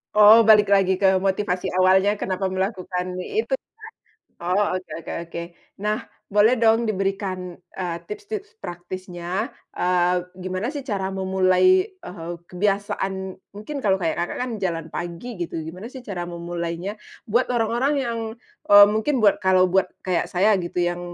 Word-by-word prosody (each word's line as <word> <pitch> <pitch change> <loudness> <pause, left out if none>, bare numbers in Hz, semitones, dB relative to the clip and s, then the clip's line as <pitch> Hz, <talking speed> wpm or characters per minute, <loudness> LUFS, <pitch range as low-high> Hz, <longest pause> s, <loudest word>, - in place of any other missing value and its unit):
Oh, 215 +2 +9
balik 210 -2 +6
lagi 190 -1 +3
ke 190 -1 +3
motivasi 190 -1 0
awalnya, 190 +2 +4
kenapa 190 0 -2
melakukan 185 -1 -3
itu 440 - -2
ya. - - -2 0.8
Oh, 185 +2 +1
oke 185 0 -5
oke 165 - -7 0.2
oke. 170 - -4 0.4
Nah, 215 +1 0 0.3
boleh 210 +4 +4
dong 225 0 +4
diberikan, 195 -3 -2
eee, 180 -1 -5
tips-tips 425 +1 -7
praktisnya, 180 +4 -5 0.2
eee, 180 0 +2 0.2
gimana 185 +3 -3
sih 285 - -4
cara 195 -5 -2
memulai, 190 - +3
eee, 180 - -8 0.2
kebiasaan. 190 0 -2 0.2
Mungkin 215 +9 -7
kalau 195 -4 +2
kayak, 160 - 0
Kakak, 175 - -2
kan 250 - -3
jalan 165 -4 -2
pagi 175 +6 -6
gitu, 170 -1 -3
gimana 180 +7 -8
sih 260 -1 -10
cara 175 -4 -4
memulainya 170 +3 -4 0.3
buat 235 +4 +1
orang-orang 240 +5 +1
yang, 230 -1 -2 0.5
eee, 205 0 +10
mungkin 225 +3 0
buat 200 -1 +5
kalau 185 -1 +4
buat 190 0 +3 0.2
kayak 185 -2 0
saya 200 +4 +3
gitu 175 0 -2
yang 175 0 -1
190 Hz, 150 wpm, -23 LUFS, 180-215 Hz, 0.8 s, eee